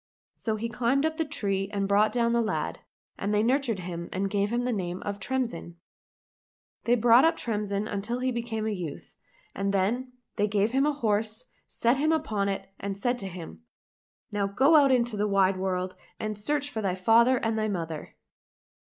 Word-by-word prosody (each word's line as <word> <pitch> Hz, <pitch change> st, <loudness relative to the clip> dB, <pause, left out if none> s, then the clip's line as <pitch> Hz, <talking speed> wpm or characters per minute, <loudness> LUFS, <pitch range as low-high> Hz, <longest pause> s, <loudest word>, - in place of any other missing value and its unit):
So 220 Hz, -2 st, -2 dB
he 220 Hz, +2 st, -3 dB
climbed 245 Hz, +5 st, +1 dB
up 315 Hz, 0 st, -1 dB
the 320 Hz, -, 0 dB
tree 195 Hz, -9 st, -1 dB
and 200 Hz, -1 st, -1 dB
brought 205 Hz, +2 st, +4 dB
down 235 Hz, -1 st, +1 dB
the 235 Hz, -, +3 dB
lad, 220 Hz, -, -2 dB, 0.4 s
and 200 Hz, -, -1 dB
they 210 Hz, 0 st, +2 dB
nurtured 245 Hz, -4 st, +1 dB
him 170 Hz, -1 st, -6 dB
and 195 Hz, +1 st, -2 dB
gave 205 Hz, +1 st, +1 dB
him 240 Hz, +1 st, 0 dB
the 250 Hz, 0 st, 0 dB
name 180 Hz, -3 st, -3 dB
of 205 Hz, 0 st, -4 dB
Tremsin. 235 Hz, -8 st, -3 dB, 1.1 s
They 240 Hz, -, +4 dB
brought 240 Hz, +1 st, +6 dB
up 325 Hz, +1 st, +3 dB
Tremsin 210 Hz, -2 st, -2 dB
until 210 Hz, +4 st, -3 dB
he 255 Hz, +1 st, 0 dB
became 230 Hz, -2 st, -3 dB
a 220 Hz, -, 0 dB
youth, 170 Hz, -7 st, -7 dB, 0.4 s
and 195 Hz, 0 st, -1 dB
then 235 Hz, +7 st, 0 dB, 0.2 s
they 205 Hz, -1 st, +2 dB
gave 205 Hz, +1 st, +1 dB
him 270 Hz, +3 st, +2 dB
a -, -, +3 dB
horse, 220 Hz, -2 st, 0 dB, 0.2 s
set 235 Hz, +3 st, +1 dB
him 305 Hz, +3 st, +2 dB
upon 215 Hz, -11 st, 0 dB
it, 195 Hz, -, -3 dB
and 195 Hz, 0 st, -4 dB
said 245 Hz, +4 st, 0 dB
to 195 Hz, -, -5 dB
him, 170 Hz, -, -9 dB, 0.4 s
" -, -, -58 dB
Now 205 Hz, -1 st, 0 dB
go 265 Hz, +11 st, +4 dB
out 285 Hz, -3 st, +6 dB
into 240 Hz, -3 st, +2 dB
the 210 Hz, +1 st, +1 dB
wide 195 Hz, -1 st, +3 dB
world 185 Hz, -1 st, -2 dB, 0.2 s
and 215 Hz, 0 st, -3 dB
search 285 Hz, +7 st, -1 dB
for 220 Hz, -, -3 dB
thy 190 Hz, -3 st, 0 dB
father 230 Hz, +7 st, +4 dB
and 225 Hz, -2 st, -1 dB
thy 215 Hz, 0 st, 0 dB
mother 165 Hz, -6 st, -4 dB
215 Hz, 195 wpm, -27 LUFS, 195-245 Hz, 1.1 s, brought